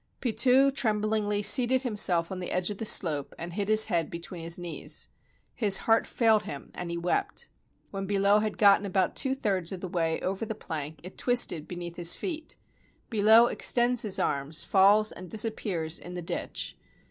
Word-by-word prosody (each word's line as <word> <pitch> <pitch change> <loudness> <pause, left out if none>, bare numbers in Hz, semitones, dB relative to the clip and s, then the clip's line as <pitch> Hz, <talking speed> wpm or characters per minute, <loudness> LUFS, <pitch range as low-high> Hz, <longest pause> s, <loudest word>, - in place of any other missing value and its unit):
Pitou 255 +3 +3
trembhngly 215 -4 -1
seated 255 +1 +4
himself 190 -8 +2
on 190 - -5
the 180 - -5
edge 180 +2 -1
of 205 - -7
the 225 - -4
slope 150 -9 +2
and 170 +1 -7
hid 200 +2 -3
his 215 0 +6
head 170 -6 -1
between 170 +1 -8
his 165 +2 -2
knees. 175 -2 -3 0.4
His 205 -5 +3
heart 225 0 +2
failed 220 -3 +2
him, 140 - -9
and 175 -1 -6
he 170 - -4
wept. 175 +1 -2 0.4
When 195 -1 -5
Billot 200 +1 +2
had 215 -1 -3
got 200 -1 +5
about 190 -2 -1
two 265 -1 -1
thirds 190 -9 -2
of 190 - -6
the 185 - -6
way 165 -2 -2
over 195 +3 -3
the 220 0 -4
plank, 155 -5 -7
it 185 - -10
twisted 240 -11 +2
beneath 175 -1 -8
his 175 -1 +4
feet. 315 -4 -6 0.6
Billot 220 +2 +5
extends 245 0 +2
his 210 -4 +1
arms, 145 +2 -1
falls, 205 +2 +4
and 185 0 -10
dis 220 0 +2
appears 175 -7 -3
in 180 +1 -10
the 175 - -6
ditch. - - -5
200 Hz, 185 wpm, -27 LUFS, 175-220 Hz, 0.6 s, his